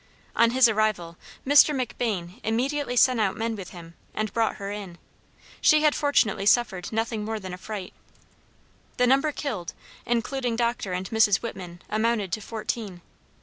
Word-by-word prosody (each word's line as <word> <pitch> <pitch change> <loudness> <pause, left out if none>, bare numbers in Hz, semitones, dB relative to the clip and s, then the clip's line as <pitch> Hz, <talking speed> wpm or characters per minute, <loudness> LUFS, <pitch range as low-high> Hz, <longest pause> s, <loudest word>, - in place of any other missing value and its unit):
On 230 - +5
his 255 +1 +5
arrival, 215 -6 0 0.3
Mr. 290 +2 +6
McBain 220 -7 -3
immediately 250 +3 -1
sent 250 -1 +4
out 195 -3 0
men 225 0 -2
with 195 -3 -8
him, 170 -2 -12 0.2
and 215 -2 -2
brought 225 -1 +1
her 200 -1 -6
in. 200 -4 -7 0.6
She 305 0 +5
had 300 -1 +4
fortunately 225 -9 +1
suffered 210 -7 +2
nothing 225 -1 -2
more 220 +1 -3
than 185 -2 -7
fright. 195 -1 -7 1.0
The 250 - +4
number 275 +4 +3
killed, 220 - -5 0.3
(including 240 +1 -1
Dr. 235 -4 -1
and 180 +1 -3
Mrs. 220 -2 +3
Whitman,) 180 -6 -7
amounted 215 -3 0
to 215 - -2
fourteen. 215 -4 -5
220 Hz, 150 wpm, -25 LUFS, 195-245 Hz, 1.0 s, Mr